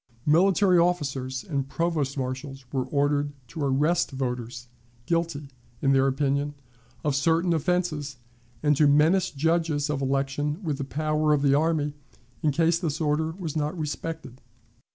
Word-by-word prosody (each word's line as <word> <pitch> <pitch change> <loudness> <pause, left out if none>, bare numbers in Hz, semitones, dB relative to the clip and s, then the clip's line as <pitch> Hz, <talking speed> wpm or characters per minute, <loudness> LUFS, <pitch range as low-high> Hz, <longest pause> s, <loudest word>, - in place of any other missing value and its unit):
Military 185 +3 +4
officers 135 -7 0
and 140 -3 -3
provost 155 -5 -1
marshals 135 +1 -5
were 130 -2 -1
ordered 145 +1 +1
to 155 +7 -7
arrest 150 +6 +2
voters, 125 -2 -4 0.4
guilty, 165 -4 -2 0.3
in 135 - +2
their 135 0 +4
opinion, 140 +1 0 0.5
of 145 -2 +1
certain 165 +4 +2
offenses, 160 -4 -1 0.5
and 150 -1 +4
to 150 +1 +4
menace 160 +6 +4
judges 155 0 0
of 140 -2 -2
election 135 +3 -1
with 150 -4 -2
the - - -1
power 155 +2 0
of 145 -1 +1
the 140 -1 +4
army 150 -1 +1 0.5
in 155 - +2
case 165 +3 +2
this 160 -4 -2
order 155 0 +1
was 165 -4 -5
not 150 +2 -1
respected. 155 -3 -5
150 Hz, 145 wpm, -26 LUFS, 135-165 Hz, 0.5 s, Military